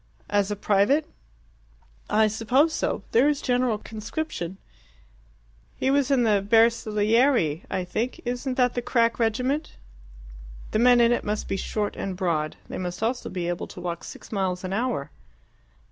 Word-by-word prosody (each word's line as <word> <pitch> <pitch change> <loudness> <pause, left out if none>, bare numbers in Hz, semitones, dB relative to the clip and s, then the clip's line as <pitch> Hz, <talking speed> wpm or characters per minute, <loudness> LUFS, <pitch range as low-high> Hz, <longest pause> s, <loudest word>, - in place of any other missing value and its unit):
"As 205 -1 +2
a 205 - -1
private?" 205 +9 +2 1.0
"I 215 +1 +4
suppose 250 +9 +2
so. - - -2
There 255 +6 +5
is 290 -2 0
general 245 -3 +1
conscription. 215 - -5 1.2
He 265 - 0
was 280 -1 +2
in 270 -3 +3
the 210 -3 +3
Bersaglieri, 225 - +3
I 190 -1 -1
think. 225 +7 -3
Isn't 250 +2 -2
that 250 -1 +3
the 245 - -2
crack 230 -1 +1
regiment?" 250 +7 -1 0.9
"The 215 - +1
men 245 0 +6
in 235 0 +5
it 240 - +1
must 210 +1 -2
be - - -1
short 205 +2 -2
and 190 -2 -4
broad. 160 -5 -1
They - - -6
must 180 +2 -4
also 240 +2 -1
be 175 -2 -3
able 175 0 -3
to - - -11
walk 175 -1 -4
six - - -11
miles 190 -3 -1
an 185 0 -3
hour." 230 - -2
220 Hz, 160 wpm, -25 LUFS, 195-250 Hz, 1.2 s, men